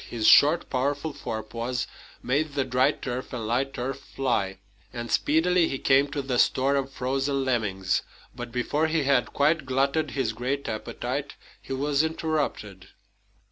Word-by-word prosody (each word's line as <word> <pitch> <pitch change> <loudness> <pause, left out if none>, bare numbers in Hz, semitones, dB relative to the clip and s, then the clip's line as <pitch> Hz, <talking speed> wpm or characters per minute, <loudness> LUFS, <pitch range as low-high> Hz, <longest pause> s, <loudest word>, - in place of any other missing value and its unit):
His 115 -2 -3
short, 155 +4 +6
powerful 145 +4 -1
forepaws 115 +2 -4 0.4
made 145 +3 0
the 140 -1 +1
dry 125 0 +3
turf 125 0 -5
and 115 -3 -4
light 130 +5 -1
earth 130 +2 -3
fly, 115 -9 -2 0.3
and 120 -1 -6
speedily 165 +3 +3
he 135 - -3
came 135 +2 +4
to 145 -1 -4
the 125 -2 0
store 135 +2 +3
of 135 -1 -1
frozen 135 +2 -1
lemmings. 100 -7 0 0.3
But 120 -1 -7
before 145 +6 0
he 160 -1 +1
had 135 -3 +2
quite 155 +3 +2
glutted 140 +4 +1
his 120 -5 0
great 130 +5 -2
appetite, 110 -1 -4 0.3
he - - -6
was 140 +1 +1
interrupted. 155 - -2
135 Hz, 150 wpm, -26 LUFS, 120-145 Hz, 0.4 s, short